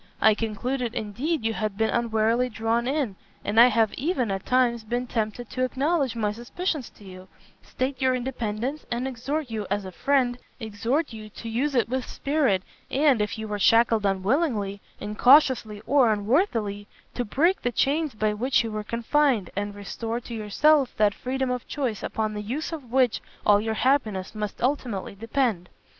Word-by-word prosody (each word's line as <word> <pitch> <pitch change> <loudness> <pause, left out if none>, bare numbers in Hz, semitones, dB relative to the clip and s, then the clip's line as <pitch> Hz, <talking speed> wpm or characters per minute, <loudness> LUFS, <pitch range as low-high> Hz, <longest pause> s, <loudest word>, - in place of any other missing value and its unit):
I 220 - +6
concluded, 230 +3 -3
indeed, 240 +7 -2
you 225 - +1
had 215 -2 -3
been 220 0 +1
unwarily 230 +1 +1
drawn 230 +1 0
in, 265 -8 -1 0.3
and 210 +2 +2
I 240 - +10
have 225 -3 +2
even, 260 - -1
at 195 0 -4
times, 245 -3 +2
been 240 +3 -2
tempted 225 0 -3
to 255 - -1
acknowledge 275 0 0
my 210 -2 0
suspicions 260 - -3
to - - -16
you, 185 -1 -11 0.3
state 260 +1 -3
your 260 -1 +3
independence, 250 +2 -3
and 240 +2 -1
exhort 265 +2 -3
you 215 -3 -3
as 200 0 -1
a 185 - -7
friend, 250 +3 +1 0.2
exhort 230 +6 -1
you 215 -1 -9
to 230 - -9
use 260 +6 -1
it 240 - +3
with 260 +2 -2
spirit, 275 -10 +1 0.3
and, 275 -4 +3
if 210 +2 -2
you 220 0 -5
were 210 -1 -3
shackled 225 +1 +4
unwillingly, 200 - 0 0.2
incautiously, 220 -1 +4
or 265 -4 +4
unworthily, 210 - 0 0.3
to 245 - -2
break 315 - +1
the 245 - 0
chains 290 +2 0
by 215 0 +1
which 245 +5 +1
you 225 - -4
were 215 0 -3
confined, 235 - +1
and 205 +1 -3
restore 225 +3 -4
to 240 - -9
yourself 265 +6 +2
that 210 -1 +4
freedom 260 +2 -2
of 250 -1 -4
choice 255 -8 -2
upon 215 -1 -2
the 210 - -4
use 260 +12 -4
of 285 -8 -7
which 255 -3 +2 0.2
all 205 0 +5
your 220 0 -2
happiness 215 -7 +1
must 210 0 -5
ultimately 245 -8 -1
depend. 220 -3 -1
230 Hz, 175 wpm, -25 LUFS, 210-265 Hz, 0.3 s, I